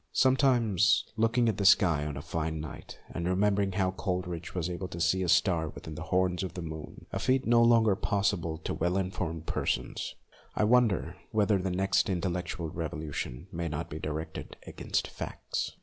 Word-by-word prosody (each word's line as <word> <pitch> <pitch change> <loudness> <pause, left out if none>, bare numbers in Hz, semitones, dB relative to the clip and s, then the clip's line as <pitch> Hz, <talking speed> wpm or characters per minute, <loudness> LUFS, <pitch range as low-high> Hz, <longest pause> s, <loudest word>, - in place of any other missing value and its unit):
Sometimes, 130 -7 +4
looking 115 +2 +2
at 110 -3 +1
the 100 - -1
sky 85 -7 +5
on 75 -2 -5
a 70 - -6
fine 80 -1 -2
night, 75 0 -8
and 85 0 -3
remembering 100 +1 +2
how 95 -2 +1
Coleridge 90 -3 -4
was 90 -2 -1
able 90 +1 -4
to 85 - -7
see 95 +3 +2
a 90 - -1
star 85 -2 +3
within 80 - -9
the - - -7
horns 90 -1 +2
of 95 - -4
the 90 - -4
48 85 - -5
MONOLOGUES 80 -1 -6
moon, - - -14
a - - -2
feat 130 0 +2
no 115 0 +5
longer 115 -3 +5
possible 95 -5 0
to 80 - -4
well 85 +3 0
in 95 -1 -1
formed 80 -4 -4
persons, - - -2 0.4
I - - +2
wonder 115 -3 +3
whether 105 -2 +2
the 95 +1 -1
next 95 +2 +1
intellectual 90 -2 -2
revolution 75 -4 -4
may 85 -1 -3
not 75 +2 -4
be 75 - -5
directed 80 +1 -5
against - - -2
facts. - - -4
90 Hz, 190 wpm, -30 LUFS, 80-100 Hz, 0.4 s, sky